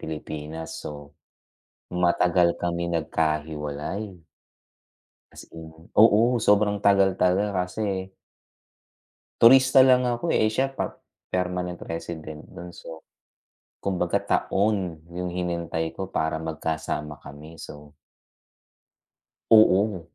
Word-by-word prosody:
Pilipinas, 80 +1 -7
so - - -4 1.1
matagal 85 0 +3
kami 85 0 -1
nagkahiwalay. 75 +3 -2 1.3
As - - -11 0.2
in 80 - -9 0.4
oo 105 -2 +6 0.3
sobrang 105 0 +3
tagal 100 -1 +5
talaga 95 0 +1
kasi 95 -1 -4 1.3
turista 130 +2 +7
lang 125 -1 +4
ako 120 +8 -1
eh, 110 - +3
eh 110 - -1
siya 135 +1 0
par 135 - -4 0.3
permanent 90 -1 -2 0.2
resident 80 -2 -7
dun 90 0 -9
so, 80 -1 -11 0.8
kumbaga 90 -3 -1
taon 95 -5 0 0.2
yung 90 0 -3
hinintay 85 -2 -3
ko 95 -1 -6
para 80 -2 -2
magkasama 80 -1 -4
kami 75 +4 -12
so 75 0 -12 1.6
oo 105 -3 +5
90 Hz, 100 wpm, -25 LUFS, 80-100 Hz, 1.6 s, turista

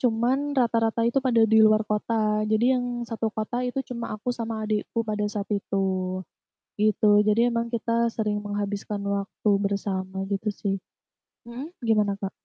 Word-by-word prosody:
cuman 255 +5 +1
rata-rata 230 -2 +2
itu 240 +4 +2
pada 235 -4 +4
di 220 0 +5
luar 215 0 +5
kota. 215 0 0
Jadi 230 +4 +3
yang 250 -1 0 0.2
satu 225 -1 -2
kota 220 +3 -3
itu 250 +1 -2
cuma 235 -3 -5
aku 245 +4 -2
sama 225 -2 -4
adikku 215 +2 -1
pada 210 -1 -1
saat 205 -1 -3
itu 195 -1 -1 0.9
gitu. 210 0 +4
Jadi 230 +3 +4
emang 230 0 -1
kita 235 0 0
sering 210 -2 0
menghabiskan 205 0 -3
waktu 200 +1 -1
bersama 195 -1 -2
gitu 200 +2 -1
sih, 195 -1 -2 0.7
mhm, 240 +5 -7 0.2
gimana, 210 -3 +2
Kak? 195 -1 -4
220 Hz, 155 wpm, -25 LUFS, 205-235 Hz, 0.9 s, di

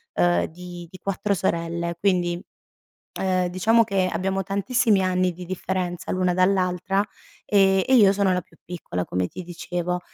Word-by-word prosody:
uhm, 85 0 +3
di 175 +1 -9
di 185 - -10
4 200 +1 -1
sorelle 170 -2 -1
quindi, 175 -2 +1 0.8
uhm, 185 -1 +1
diciamo 220 +6 +3
che 195 -3 0
abbiamo 190 +3 -1
tantissimi 200 +2 +1
anni 185 0 +1
di 180 +2 -8
differenza 180 0 -3
l'una 185 -1 +1
dall'altra, 185 +1 +1 0.4
ehm, 195 -2 +4
e 265 - +3
io 205 -6 +7
sono 200 -1 +2
la 180 - +1
più - - -21
piccola 160 - -4
come 90 0 -1
ti 185 - -8
dicevo. 175 0 -3
185 Hz, 155 wpm, -24 LUFS, 175-195 Hz, 0.8 s, io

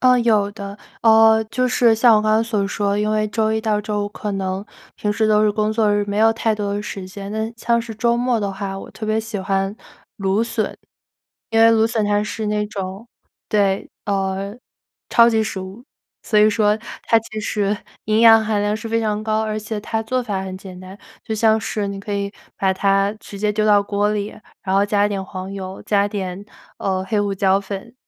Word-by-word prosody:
呃， 255 -1 +5
有 215 -4 +2
的。 200 -1 -7 0.3
呃， 220 0 +6
就 255 +4 -1
是 240 -2 +4
像 225 0 +5
我 - - +3
刚 215 - +2
刚 220 +1 +4
所 210 -4 -1
说， 200 0 -1
因 210 0 0
为 215 0 +1
周 220 0 0
一 220 - 0
到 215 -2 0
周 210 -1 -2
五， - - -4
可 210 0 -5
能 190 0 -3 0.3
平 210 0 -1
时 220 +1 +1
都 215 0 +4
是 215 - +4
工 215 +1 0
作 215 -2 +2
日， 205 0 +1
没 205 +1 -2
有 225 +1 +5
太 225 -1 0
多 205 -1 -2
时 195 -2 -6
间， 195 +1 -8
但 220 +1 -2
像 235 0 +1
是 230 -1 -7
周 235 +2 +1
末 245 -1 +1
的 200 -2 -2
话， 195 0 -5
我 - - -10
特 215 - -7
别 215 0 +1
喜 220 -1 -4
欢 195 +1 -1 0.4
芦 195 +2 +1
笋。 225 -1 -2 0.8
因 225 - +3
为 225 - +7
芦 225 -1 +4
笋 225 -2 0
它 205 0 +1
是 215 0 -4
那 210 0 0
种 195 +2 -6 0.4
对， 200 -2 +1 0.2
呃， 195 +1 -2 0.5
超 235 0 +6
级 220 -1 +2
食 200 -3 -4
物。 190 +6 -9 0.4
所 210 -2 +3
以 215 +1 +6
说， 210 -1 +2 0.3
它 230 - +4
其 215 -1 -10
实 205 0 0 0.3
营 215 +1 +2
养 225 -1 +8
含 210 -1 0
量 205 +1 0
是 225 +1 -6
非 230 0 +1
常 215 -1 -1
高。 220 0 0
而 215 0 -2
且 215 0 -4
它 225 +1 -2
做 250 +3 -1
法 200 -4 -2
很 190 -1 -6
简 185 -1 -10
单， 185 +2 -11 0.3
就 220 - -3
像 220 0 +3
是 210 -1 -3
你 200 0 -5
可 205 +1 -5
以 200 0 -2 0.3
把 190 -1 +2
它 195 +1 +2
直 200 - -10
接 210 +1 0
丢 215 +1 0
到 205 -1 +5
锅 205 +1 0
里， 205 0 -3 0.3
然 190 -2 -1
后 200 +1 +4
加 205 0 +2
一 - - 0
点 195 -1 -3
黄 185 0 -7
油， 190 -1 -7
加 200 -1 +2
一 - - -3
点， 195 -2 -4 0.3
呃， 190 -1 -1
黑 205 +2 0
胡 200 -1 -1
椒 190 0 +3
粉， 200 +4 -7
210 Hz, 240 characters per minute, -20 LUFS, 200-220 Hz, 0.8 s, 养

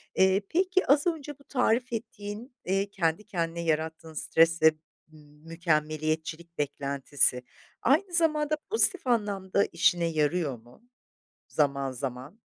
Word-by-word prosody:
eee, 190 +1 +4
peki, 370 +2 +1
az 285 +4 +4
önce 295 -4 -3
bu 280 - -19
tarif 250 -2 0
ettiğin, 220 +2 -6
eee, 195 +2 0
kendi 180 -1 -1
kendine 170 -4 -3
yarattığın 160 0 -2
stresle 165 +1 +4 0.4
m 155 - -16 0.3
mükemmeliyetçilik 160 0 -2
beklentisi 140 -3 0 0.4
aynı 340 +8 +2
zamanda 305 -3 +2
pozitif 400 - +4
anlamda 200 -4 +1
işine 170 0 +2
yarıyor 155 -3 0
mu 120 - -20 0.7
zaman, 140 -3 0
zaman? 130 - -6
170 Hz, 115 wpm, -28 LUFS, 155-240 Hz, 0.7 s, eee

